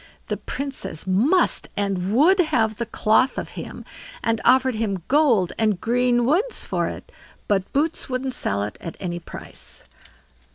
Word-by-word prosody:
The - - -1
Princess 275 - -5
must 235 - +2
and 195 -2 -1
would 320 - +5
have 225 - +2
the 235 - -3
cloth 230 +4 +2
of - - -4
him, - - -8 0.4
and 225 -1 0
offered 260 +1 +4
him 205 -5 -2
gold 255 - +3
and 215 -4 +2
green 240 +2 +2
woods 380 - +1
for - - -1
it, - - -8 0.4
but 195 -2 0
Boots 300 +2 0
wouldn't 255 0 -2
sell 100 - -1
it 105 0 -6
at 165 - -7
any 175 -2 -3
price. 170 - -10
230 Hz, 155 wpm, -23 LUFS, 195-270 Hz, 0.4 s, would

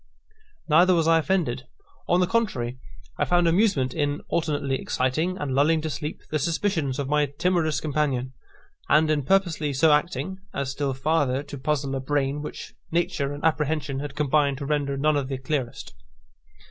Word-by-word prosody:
Neither 175 +4 +5
was 165 -1 +2
I 165 0 +5
offended. 155 -7 -1 0.4
On 175 +1 +3
the - - +4
contrary, 160 - -1 0.4
I - - +2
found 175 -1 +3
amusement 165 - +2
in 145 -1 -1
alternately 145 -5 -1
exciting, 155 +9 -1
and 145 -8 -3
lulling 150 +4 +3
to 155 0 -3
sleep, 150 +2 -5
the 155 - 0
suspicions 160 -4 0
of 140 - -2
my 150 0 +2
timorous 160 +2 0
companion, 140 -4 -1 0.6
and 155 0 +4
in 150 -1 +1
purposely 160 -2 +1
so 150 +4 +4
acting 175 +5 0 0.2
as 140 -1 -2
still 135 -1 -2
farther 140 -1 +1
to 145 0 -9
puzzle 140 -1 -1
a - - -1
brain 140 +1 -1
which 150 - -8 0.2
nature 165 -4 0
and 145 0 -7
apprehension 150 -3 0
had 145 0 -6
combined 145 -1 +2
to 140 - -5
render 140 -1 -1
none 150 +2 +2
of 140 -2 -1
the 135 -1 -3
clearest. 130 -2 -4
150 Hz, 170 wpm, -25 LUFS, 135-165 Hz, 0.6 s, Neither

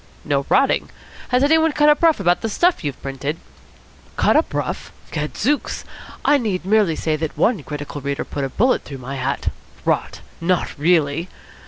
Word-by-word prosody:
"No - - 0
rotting. - - +3 0.4
Has 250 +1 +3
anybody 320 +1 +4
cut 295 0 +4
up 300 0 +5
rough 330 -6 +4
about 175 -2 +2
the 225 - -2
stuff 345 - +2
you've 145 -3 -3
printed?" 140 +3 -3 0.8
"Cut - - +3
up - - +3
rough? - - -3 0.2
Gadzooks! 215 - -1 0.4
I 290 - +5
need 195 -7 -2
merely 200 -5 +3
say 155 0 0
that 160 -1 -4
one 225 -8 +2
critical 145 0 -6
reader 140 +1 -2
put 140 - -4
a 135 - -1
bullet 250 - +2
through 140 - -8
my 130 +2 -6
hat 135 +2 -1 0.2
" - - -25
"Rot! - - 0 0.2
Not 180 +1 0
really?" 160 +1 +2
170 Hz, 175 wpm, -21 LUFS, -, 0.8 s, up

